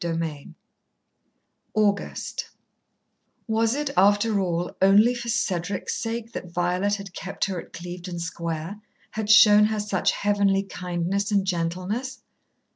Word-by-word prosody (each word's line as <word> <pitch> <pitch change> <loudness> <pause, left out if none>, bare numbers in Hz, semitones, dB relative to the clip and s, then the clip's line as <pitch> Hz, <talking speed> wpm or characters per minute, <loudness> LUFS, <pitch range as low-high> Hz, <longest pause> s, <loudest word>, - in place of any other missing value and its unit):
XXVI 165 -4 -4 1.2
August 205 -2 -1 1.0
Was 225 +1 +1
it, 295 -1 -2
after 205 +2 +4
all, 175 -2 -2
only 205 +5 +6
for 240 -1 -5
Cedric's 195 -4 -1
sake 230 0 -4
that 180 - -7
Violet 180 +4 0
had 200 -2 -9
kept 195 - -3
her 185 -3 -3
at - - -17
Clevedon 175 0 -7
Square 170 +3 -4 0.3
had 215 -1 -4
shown 210 -1 +8
her 215 0 -1
such 200 -2 0
heavenly 200 -1 +2
kindness 185 +2 -2
and 200 -2 +2
gentleness? 185 +9 -3
195 Hz, 120 wpm, -25 LUFS, 175-215 Hz, 1.2 s, shown